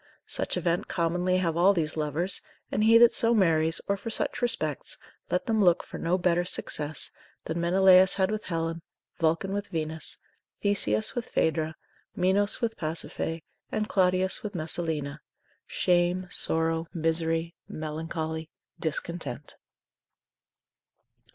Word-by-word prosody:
Such - - -2
event 175 0 -1
commonly 180 +1 0
have 170 -3 0
all 185 +4 +4
these 155 -4 -2
lovers; 155 +4 -1 0.3
and 215 - 0
he 225 +1 +7
that 235 0 +6
so 230 0 +3
marries, 165 -5 +3
or 200 - +1
for 200 - -7
such 225 - -2
respects, 155 - -1 0.3
let 180 - -1
them 220 -2 +1
look 175 -2 +3
for - - -9
no 170 +2 0
better 175 -1 +1
success 155 -3 0 0.3
than 160 +2 -3
Menelaus 185 +1 +5
had 190 0 +1
with 215 0 -4
Helen, 165 -1 -3 0.4
Vulcan 165 +4 0
with 205 0 -3
Venus, 160 -1 -2 0.4
Theseus 110 - +2
with 240 -2 -5
Phaedra, 160 0 0 0.4
Minos 195 +5 +4
with 225 -1 -2
Pasiphae, 165 0 -3 0.3
and 215 0 -1
Claudius 185 -1 +1
with 210 -2 -6
Messalina; 155 -3 -3 0.5
shame, 175 +1 +1
sorrow, 165 0 +3
misery, 165 0 -1 0.2
melancholy, 160 +1 -5 0.3
discontent. 150 -4 -4
170 Hz, 130 wpm, -27 LUFS, 160-190 Hz, 0.5 s, he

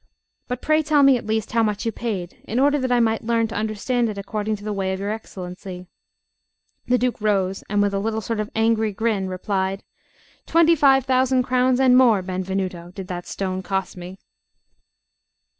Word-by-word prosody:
But 250 0 -5
pray 310 0 +3
tell 300 -1 +3
me 275 -1 +6
at 235 - -5
least 220 -1 -1
how 230 - +2
much 210 0 -1
you 225 - 0
paid, 195 -6 -5
in 230 - -3
order 285 +2 +3
that 255 -1 -1
I 245 - +4
may 225 -1 +2
learn 230 0 0
to 225 - -7
understand 220 +3 -1
it 210 - -6
according 210 +2 -3
to 205 - -12
the 210 0 -3
way 190 -1 -1
of 190 - -4
your 200 +1 -2
Excellency." 180 -3 -7 1.0
The 250 - +3
Duke 250 -2 -1
rose, 195 -2 0
and, 205 -1 +2
with 200 -1 0
a 195 - 0
little 220 +2 -1
sort 220 +1 -3
of 215 0 -2
angry 220 -1 +1
grin, 210 -2 -1
replied: 190 +1 -2 0.6
"Twenty 335 0 +5
five 270 -3 +4
thousand 260 0 +2
crowns 255 0 +2
and 260 -2 +5
more, 235 -7 +5
Benvenuto, 185 -1 -3
did 190 -2 -7
that 175 -1 -5
stone 185 -1 -3
cost 190 +1 -3
me!" 180 +1 -9
215 Hz, 190 wpm, -22 LUFS, 195-245 Hz, 1.0 s, me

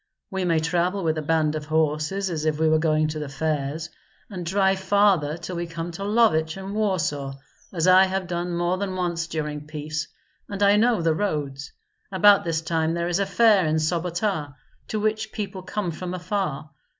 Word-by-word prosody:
We 190 -1 -1
may 165 -2 +2
travel 175 +4 0
with 160 -1 0
a - - -3
band 155 0 +1
of 155 -1 -4
horses, 160 +5 0
as 155 -3 -3
if 155 -1 +1
we 160 - +3
were 155 0 +4
going 155 -1 +2
to 155 0 -4
the 150 -2 -5
fairs, 155 +2 -2 0.4
and 180 -3 -5
drive 190 +2 +2
farther 190 -6 +2
till 175 +1 -6
we 170 0 -3
come 165 +1 -5
to 175 +4 -6
Lovich 195 -7 +2
and 195 +1 -6
Warsaw, 155 -10 -1 0.3
as 170 -3 -1
I 185 +1 +7
have 190 0 -2
done 175 0 -3
more 175 +2 0
than 195 -2 -3
once 170 -2 -2
during 150 -2 -4
peace, 155 +1 -4 0.4
and 200 0 -2
I 200 0 +6
know 220 -3 +3
the 165 -1 +3
roads. 145 -7 -3 0.4
About 200 +2 +6
this 165 -2 -1
time 160 0 0
there 170 0 -1
is 175 +2 +1
a 200 - 0
fair 200 -3 +4
in 155 - +1
Sobota, 170 -1 -1 0.3
to 215 - -2
which 215 0 -1
people 195 -3 -5
come 185 -1 -3
from 180 +3 -5
afar. 175 -6 -3
170 Hz, 195 wpm, -24 LUFS, 155-195 Hz, 0.4 s, I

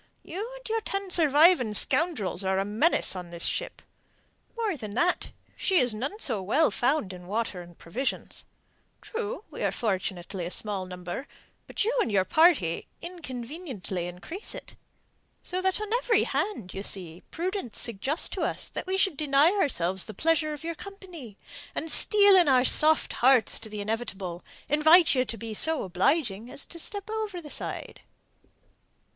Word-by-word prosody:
You 420 +7 -6
and - - -11
your 450 0 -1
ten 395 -2 -4
surviving 305 -7 +5
scoundrels 220 - +1
are 190 0 +1
a 195 - 0
menace 220 - +2
on 180 -2 -7
this 170 0 -5
ship. - - -3 0.7
More 440 -6 0
than 215 -6 -7
that, 350 +7 +1 0.3
she 380 - +1
is 245 -3 +1
none 270 - -4
so 235 - 0
well 275 - +2
found 245 -6 0
in 180 -1 -11
water 205 -2 -2
and 175 -1 -14
provisions. 245 +11 -4 0.6
True, 455 0 -5
we - - -8
are - - +1
fortunately 185 -4 -3
a - - -4
small 195 -1 -3
number, 180 +8 -6 0.4
but - - -1
you 470 +3 0
and - - -1
your 190 -2 +2
party 300 - +3
inconveniently 260 - -6
increase 255 - -7
it. - - -9 0.7
So 365 +1 -3
that 380 +1 +1
on 425 +1 -4
every 480 -1 +2
hand, 235 - -2
you 195 - -5
see, 180 -4 -5
prudence 360 - -3
suggests 235 - +2
to - - -5
us - - -2
that - - -6
we 380 +1 0
should 385 -4 +2
deny 290 +2 +4
ourselves 190 - +1
the 215 - -9
pleasure 315 - +1
of 300 +1 -7
your 335 +1 -3
company, 345 - -11 0.4
and, 320 - -2
steeling 400 -5 +6
our 255 -2 +4
soft 310 +3 +4
hearts 255 -1 +4
to 220 - -7
the 210 -1 -5
inevitable, 200 -5 -4 0.2
invite 315 +4 +6
you 255 -2 +2
to 230 0 -5
be 225 +1 -6
so 320 +8 +1
obliging 205 - 0
as 280 - -3
to 335 - -11
step 405 +4 -3
over 430 -4 -3
the 300 -4 -11
side." - - -5
275 Hz, 165 wpm, -27 LUFS, -, 0.7 s, steeling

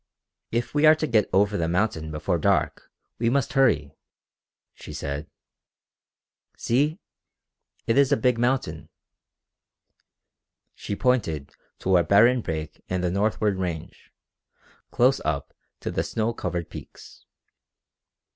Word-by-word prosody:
"If 120 +1 -2
we 150 +1 +4
are 155 - +8
to 155 - -2
get 110 -7 +2
over 100 +2 +2
the 80 - 0
mountain 85 -3 -1
before 80 +3 -1
dark - - 0 0.3
we 115 0 +2
must 135 0 0
hurry," 105 - +2 0.8
she - - -11
said. 70 +2 -5 1.3
"See 145 +7 +1 0.9
it 115 +4 +3
is 140 0 +4
a 140 - +4
big 125 -3 +1
mountain!" 120 -10 -1 1.8
She 100 - -5
pointed 100 - 0 0.3
to 95 -1 +2
a 85 - +3
barren 120 +7 +5
break 80 -3 -5
in 90 0 -1
the 90 -1 0
northward 105 0 0
range, 85 -2 -5 0.8
close 130 +3 +3
up 70 -3 -2 0.3
to - - -3
the - - -1
snow 115 +1 -1
covered 90 -6 -4
peaks. - - -12
105 Hz, 125 wpm, -25 LUFS, 85-125 Hz, 1.8 s, are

